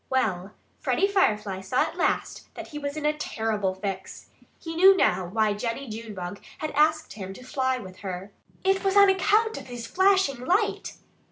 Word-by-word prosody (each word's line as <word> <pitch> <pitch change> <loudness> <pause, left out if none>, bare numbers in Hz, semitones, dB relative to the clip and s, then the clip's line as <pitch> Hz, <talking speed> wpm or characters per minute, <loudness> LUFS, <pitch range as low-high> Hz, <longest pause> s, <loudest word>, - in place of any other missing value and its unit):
Well, 200 -7 -1 0.2
Freddie 395 - +1
Firefly 210 - +1
saw 190 +7 +1
at - - -5
last - - -1
that - - -8
he 295 - -6
was 285 +1 -4
in 300 - -3
a 300 - +3
terrible 215 -9 -2
fix. 190 0 -6 0.3
He 325 -1 -7
knew 380 +3 +7
now 185 - +2
why 215 +2 +1
Jennie 230 +6 -4
Junebug 210 -4 -7 0.2
had 310 - -4
asked 310 +2 +2
him 195 -2 -7
to 255 - -12
fly 260 0 -1
with 185 -6 -10
her. 190 0 -6 0.3
It 385 +1 +2
was 390 0 +2
on 400 -1 +8
account 425 +4 +2
of - - -14
his 240 -2 -7
flashing 380 -4 +2
light! 400 +8 0
255 Hz, 180 wpm, -26 LUFS, -, 0.3 s, on